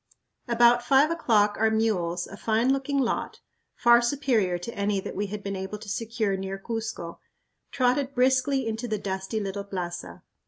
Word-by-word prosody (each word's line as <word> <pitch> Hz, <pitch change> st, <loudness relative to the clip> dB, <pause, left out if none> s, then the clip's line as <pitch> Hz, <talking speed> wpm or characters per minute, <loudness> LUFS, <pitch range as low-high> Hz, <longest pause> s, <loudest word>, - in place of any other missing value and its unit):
About 240 Hz, 0 st, +5 dB
five 270 Hz, +5 st, +4 dB
o'clock 215 Hz, -10 st, +2 dB
our 220 Hz, 0 st, +4 dB
mules, 185 Hz, -6 st, 0 dB
a -, -, -10 dB
fine 225 Hz, +5 st, +1 dB
looking 275 Hz, +1 st, -1 dB
lot 255 Hz, -4 st, -1 dB, 0.4 s
far 235 Hz, 0 st, +5 dB
superior 240 Hz, -8 st, +1 dB
to 175 Hz, +7 st, -7 dB
any 200 Hz, 0 st, 0 dB
that -, -, -6 dB
we 205 Hz, +1 st, -2 dB
had 205 Hz, +1 st, -6 dB
been 200 Hz, 0 st, -3 dB
able 190 Hz, +2 st, -5 dB
to 215 Hz, +1 st, -12 dB
secure 215 Hz, 0 st, -1 dB
near 190 Hz, 0 st, -4 dB
Cuzco 220 Hz, -5 st, -5 dB, 0.5 s
trotted 260 Hz, +2 st, 0 dB
briskly 260 Hz, +1 st, +2 dB
into 225 Hz, +2 st, -3 dB
the 215 Hz, -2 st, -1 dB
dusty 190 Hz, +2 st, -3 dB
little 200 Hz, -1 st, -4 dB
plaza. 180 Hz, -3 st, -6 dB
220 Hz, 165 wpm, -26 LUFS, 195-245 Hz, 0.5 s, About